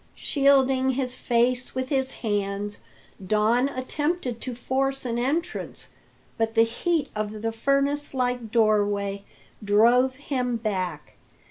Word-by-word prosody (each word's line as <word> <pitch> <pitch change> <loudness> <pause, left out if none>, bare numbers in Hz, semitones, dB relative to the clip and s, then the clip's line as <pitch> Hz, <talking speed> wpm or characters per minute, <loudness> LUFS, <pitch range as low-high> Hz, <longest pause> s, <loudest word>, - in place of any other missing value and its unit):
Shielding 270 -2 +3
his 255 -1 -2
face 245 +1 0
with 260 0 -2
his 265 -2 +2
hands, 205 -1 -2 0.4
Don 220 +7 +2
attempted 275 -1 -2
to 255 -2 -5
force 270 +2 -1
an 235 -1 -1
entrance, 285 +8 -2 0.5
but 225 0 0
the 225 - +6
heat 295 +6 -1
of 215 0 -4
the 225 - 0
furnace 275 +4 0
like 245 -2 -1
doorway 205 -3 +1 0.4
drove 240 +5 +4
him 255 -3 -2
back. 185 -8 -3
245 Hz, 120 wpm, -25 LUFS, 215-265 Hz, 0.5 s, the